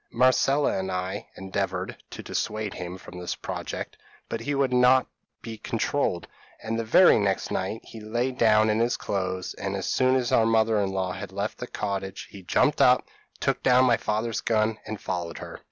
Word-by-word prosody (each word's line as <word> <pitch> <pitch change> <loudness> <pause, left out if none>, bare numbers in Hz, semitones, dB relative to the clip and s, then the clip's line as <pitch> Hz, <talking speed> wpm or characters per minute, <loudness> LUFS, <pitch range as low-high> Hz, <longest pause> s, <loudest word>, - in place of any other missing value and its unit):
Marcella 130 +2 +3
and 95 0 -3
I 95 +2 -3
endeavoured 95 0 -3
to - - -8
dissuade 105 -2 -3
him 90 0 -6
from 90 -1 -11
this 90 - -3
project; - - -6 0.3
but 115 - -3
he 145 +5 -2
would 135 -2 +1
not 125 +1 +5 0.4
be 110 -2 -7
controlled; 110 -6 -1 0.4
and 115 +1 -2
the - - -1
very 115 +6 +6
next 100 -2 0
night 95 +4 -2
he 115 - -11
lay 120 +4 -1
down 110 -3 +4
in 110 - +1
his 120 +1 +1
clothes, 95 -2 -3
and 100 0 -4
as 95 - -3
soon 130 0 +2
as 125 -2 0
our 115 - +4
mother 110 -1 +3
in 100 -1 0
law 95 -1 -2
had 95 +1 -7
left 100 +2 -4
the 125 - -5
cottage 100 -3 -4
he 100 - -10
jumped 90 - +2
up, - - +5 0.3
took - - 0
down 125 0 +5
my 120 -2 +4
father's 110 +1 -2
gun, 110 -1 +1
and 110 -1 -5
followed 85 -3 -4
her. - - -8
110 Hz, 190 wpm, -26 LUFS, 95-120 Hz, 0.4 s, very